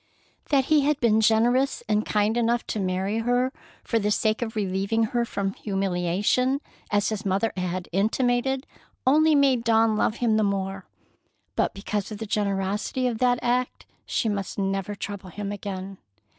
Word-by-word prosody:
That 275 -3 +3
he 305 0 +4
had 290 0 +1
been 220 -2 +3
generous 240 +5 +3
and 210 0 +2
kind 210 +1 +1
enough 235 0 +1
to 215 - -3
marry 190 +3 -1
her 245 +3 +1 0.3
for 230 - 0
the 210 -1 0
sake 215 +1 +1
of 225 -1 -3
relieving 200 +2 0
her 235 +2 0
from 195 -3 -2
humiliation, 195 +7 0 0.3
as 205 -1 +1
his 215 -1 -3
mother 200 +3 0
had 180 -1 -3
intimated, 245 +7 +1 0.4
only 305 +4 +5
made 270 -4 +3
Dawn 225 -1 +3
love 215 - +1
him 230 -3 +1
the 215 - +2
more. 195 -1 -2 0.7
But - - 0
because 205 +1 -3
of 210 - -5
the 220 - -5
generosity 205 +4 -1
of 235 -3 -1
that 245 -1 +3
act, 245 +1 -1 0.2
she - - 0
must 200 -3 -3
never 195 0 -1
trouble 200 -1 -6
him 200 +3 -5
again. 195 -1 -6
215 Hz, 165 wpm, -25 LUFS, 195-245 Hz, 0.7 s, only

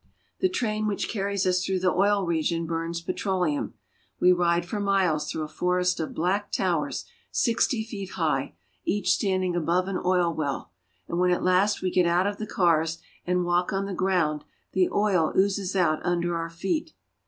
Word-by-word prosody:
The 375 - +2
train 215 -10 -1
which 205 - -1
carries 200 -2 -1
us 180 0 +2
through 190 -1 -1
the 185 -1 +2
oil 200 0 +2
region 165 0 0
burns 165 +1 -3
petroleum. 175 - -1 0.4
We 180 - +6
ride 175 -1 +2
for 210 +3 -4
miles 185 -7 +1
through 155 - -3
a - - -4
forest 180 +2 0
of 160 - -4
black 190 +5 0
towers - - -1 0.2
sixty 230 -1 +1
feet 200 -4 -7
high, 150 - -1 0.3
each 195 -2 +1
standing 185 -3 +1
above 175 +2 +1
an 195 -1 -2
oil 180 -2 +2
well; 145 - -3 0.4
and 170 - -2
when 180 0 +3
at 180 - +1
last 185 +3 +2
we 185 - 0
get 180 -1 +3
out 175 +2 +3
of 205 0 -1
the 215 - -5
cars, 165 -3 +2 0.3
and 180 0 +1
walk 175 +1 +1
on 195 0 -1
the 195 - -4
ground, 175 -6 +1 0.3
the 185 -1 +2
oil 190 -6 +2
oozes 195 0 +1
out 170 -5 +2
under 175 -1 0
our 165 0 -3
feet. 310 - -3
180 Hz, 180 wpm, -26 LUFS, 170-195 Hz, 0.4 s, We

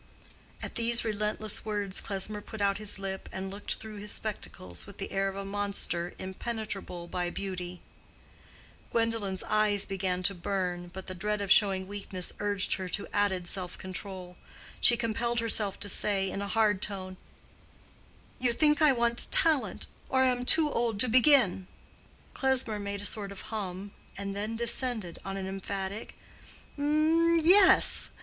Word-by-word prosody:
At - - -6
these 235 0 +2
relentless 215 -1 -1
words 205 -3 -2
Klesmer 205 +1 -2
put 220 +1 -9
out 200 0 +1
his 210 -2 0
lip 195 -1 -5
and 190 0 -5
looked 200 +1 -3
through 220 -1 -10
his 205 +1 -5
spectacles 90 - -5
with 200 - -12
the 195 - -5
air 195 0 0
of 195 - -4
a 195 0 -5
monster 195 -3 -1
impenetrable 195 -2 -5
by 175 0 -2
beauty. 180 -1 -5 1.1
Gwendolen's 225 -5 0
eyes 210 -1 +2
began 185 -2 -2
to 195 - +2
burn, 180 -1 -3
but 190 +1 -8
the 185 - -6
dread 210 +3 -2
of 200 -1 -2
showing 190 -3 +4
weakness 195 -3 -4
urged 205 -2 +1
her 185 -1 -5
to 200 - -1
added 195 -3 +1
self 180 0 -3
control. 185 -1 -8 0.4
She 240 - +6
compelled 235 +1 -1
herself 215 -3 +1
to 205 - +1
say, 195 -1 0
in 195 - -4
a 200 - -3
hard 210 -2 +2
tone, 185 -2 -3 1.2
"You 245 -1 +2
think 300 +4 +3
I 305 -2 +7
want 235 -1 +2
talent, 315 -4 +3 0.2
or 260 0 +3
am 250 -1 +1
too 305 +2 +6
old 230 -3 0
to 255 - +3
begin." 240 -7 +4 0.7
Klesmer 260 -5 +1
made 200 0 -4
a - - -6
sort 205 -1 -1
of 200 - -7
hum, 195 -1 -5 0.3
and 200 0 -4
then 210 +3 -3
descended 235 -5 -1
on 195 0 -5
an 190 - -4
emphatic 195 +1 -5 0.6
"Yes! 330 +5 +5
205 Hz, 155 wpm, -29 LUFS, 190-230 Hz, 1.2 s, I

